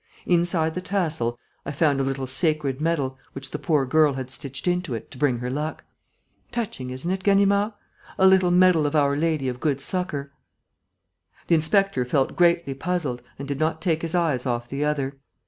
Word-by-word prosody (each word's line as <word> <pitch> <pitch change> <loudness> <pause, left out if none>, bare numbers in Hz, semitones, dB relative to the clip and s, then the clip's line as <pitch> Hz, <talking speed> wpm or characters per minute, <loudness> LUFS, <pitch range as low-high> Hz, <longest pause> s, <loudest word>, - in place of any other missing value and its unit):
Inside 170 -2 +2
the 180 - -4
tassel, 160 -11 -1 0.3
I 140 - -5
found 145 -1 +2
a - - +1
little 135 0 -2
sacred 145 0 0
medal, 140 -5 -1
which 135 0 -6
the - - -4
poor 150 -5 +1
girl 150 +2 +3
had 130 -1 -5
stitched 135 +4 -6
into 180 -7 0
it 115 - -8
to 135 - -10
bring 130 -4 +2
her 125 +1 -4
luck. 150 +3 -4 0.7
Touching, 200 - -4
isn't 130 +8 -4
it, 190 0 -2
Ganimard? 200 +2 +3 0.4
A 190 - +4
little 190 -1 +5
medal 180 -4 +4
of 145 - -3
Our 140 -1 +3
Lady 155 -3 0
of 125 -1 -3
Good 140 -2 0
Succour." 145 -3 -3 1.1
The - - +1
inspector 165 -2 +2
felt 135 +2 0
greatly 170 -4 +3
puzzled 145 -4 -2 0.2
and 140 - -7
did 140 -1 -3
not 155 0 0
take 165 -2 0
his 165 +1 -2
eyes 150 -7 +1
off 120 -1 -2
the 140 +3 -3
other. 140 -2 -1
150 Hz, 185 wpm, -24 LUFS, 135-175 Hz, 1.1 s, little